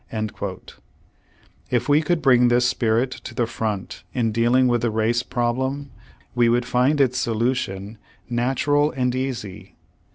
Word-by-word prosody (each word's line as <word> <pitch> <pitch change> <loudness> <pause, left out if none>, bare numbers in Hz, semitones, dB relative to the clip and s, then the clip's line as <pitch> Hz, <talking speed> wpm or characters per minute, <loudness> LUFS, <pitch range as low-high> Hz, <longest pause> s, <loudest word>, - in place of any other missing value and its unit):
^ 105 -3 -5 1.0
If - - 0
we 145 +1 +4
could 165 -1 -1
bring 125 -2 +5
this 120 +1 +3
spirit 115 +3 +1
to 120 - -9
the 120 - +1
front 105 -5 -4
in 115 -3 +1
dealing 120 +3 +3
with 120 -1 +1
the 120 - +1
race 110 +2 +1
problem, 130 +4 -2 0.4
we 120 -1 +3
would 120 +1 +2
find 125 +5 +2
its 130 -2 +2
solution 110 -3 -2 0.3
natural 135 +5 +1
and 125 -4 -1
easy. 130 -7 -5
120 Hz, 140 wpm, -22 LUFS, 115-130 Hz, 1.0 s, bring